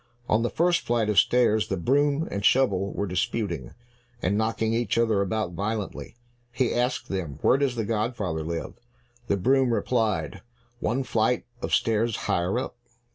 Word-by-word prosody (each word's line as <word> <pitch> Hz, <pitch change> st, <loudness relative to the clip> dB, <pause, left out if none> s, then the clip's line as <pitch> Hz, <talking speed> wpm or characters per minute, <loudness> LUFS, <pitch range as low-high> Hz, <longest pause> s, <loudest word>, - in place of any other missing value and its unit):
On 110 Hz, -, +2 dB
the 120 Hz, -, 0 dB
first 175 Hz, +1 st, +2 dB
flight 115 Hz, -3 st, 0 dB
of 105 Hz, -, +5 dB
stairs, 115 Hz, -3 st, +3 dB
the 95 Hz, -, -2 dB
broom 145 Hz, -, +1 dB
and 100 Hz, -, -3 dB
shovel 100 Hz, -6 st, +3 dB
were 100 Hz, -, -2 dB
disputing, 90 Hz, -, -2 dB, 0.4 s
and 100 Hz, -2 st, 0 dB
knocking 110 Hz, +1 st, 0 dB
each 120 Hz, 0 st, 0 dB
other 110 Hz, -4 st, +2 dB
about 100 Hz, -1 st, -1 dB
violently. 105 Hz, +4 st, -4 dB, 0.4 s
He 125 Hz, 0 st, 0 dB
asked 125 Hz, +1 st, 0 dB
them, 85 Hz, -8 st, -4 dB
"Where -, -, +5 dB
does 135 Hz, -3 st, +1 dB
the 115 Hz, -2 st, -2 dB
godfather 105 Hz, -7 st, -2 dB
live?" 80 Hz, +1 st, -4 dB, 0.5 s
The 100 Hz, -, +1 dB
broom 130 Hz, +5 st, +3 dB
replied, 110 Hz, -6 st, 0 dB, 0.4 s
"One 125 Hz, +4 st, 0 dB
flight 115 Hz, 0 st, 0 dB, 0.2 s
of -, -, -3 dB
stairs 115 Hz, 0 st, +2 dB
higher 90 Hz, +2 st, 0 dB
up." -, -, -3 dB
110 Hz, 160 wpm, -26 LUFS, 100-120 Hz, 0.5 s, of